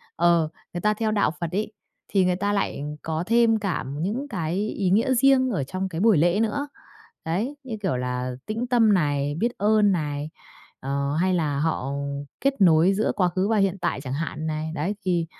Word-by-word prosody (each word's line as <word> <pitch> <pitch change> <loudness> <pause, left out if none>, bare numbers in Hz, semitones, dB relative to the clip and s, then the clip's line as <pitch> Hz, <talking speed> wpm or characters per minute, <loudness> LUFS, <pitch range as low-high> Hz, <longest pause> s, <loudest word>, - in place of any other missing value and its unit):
ờ, 170 -2 +3 0.2
người 175 - -4
ta 210 +3 +3
theo 215 0 -1
đạo 205 -7 +2
Phật 170 -2 -3
ấy, 210 +3 -2 0.4
thì 195 -2 +2
người 180 0 +2
ta 205 +2 -1
lại 200 -7 -1 0.2
có 160 +1 -2
thêm 230 -1 +4
cả 190 - -2
những 200 - -3
cái 175 - -3
ý 200 -3 -1
nghĩa 230 +8 +3
riêng 260 0 +4
ở 175 - -1
trong 185 +7 -4
cái 165 -1 -4
buổi 220 -4 +5
lễ 175 +6 +3
nữa. 225 +6 -1 0.6
Đấy, 210 - -2
như 240 -4 -5
kiểu 180 -10 0
là 125 0 -2
tĩnh 225 +3 -2
tâm 235 -4 +4
này, 145 -4 0
biết 235 +5 0
ơn 210 -1 +4
này, 150 -3 -2 0.5
ờ, 140 +1 -2
hay 185 0 +2
là 150 -5 0
họ 150 -3 -1 0.5
kết 275 -4 0
nối 175 +1 +5
giữa 210 +3 +1
quá 185 -3 +3
khứ 185 +3 -1
và 225 - +2
hiện 195 -1 +1
tại 175 -5 -2
chẳng 130 -2 -6
hạn 155 +1 -3
này. 155 0 -3
Đấy, 160 +7 -1
thì, 175 -3 +1
185 Hz, 205 wpm, -24 LUFS, 155-215 Hz, 0.6 s, buổi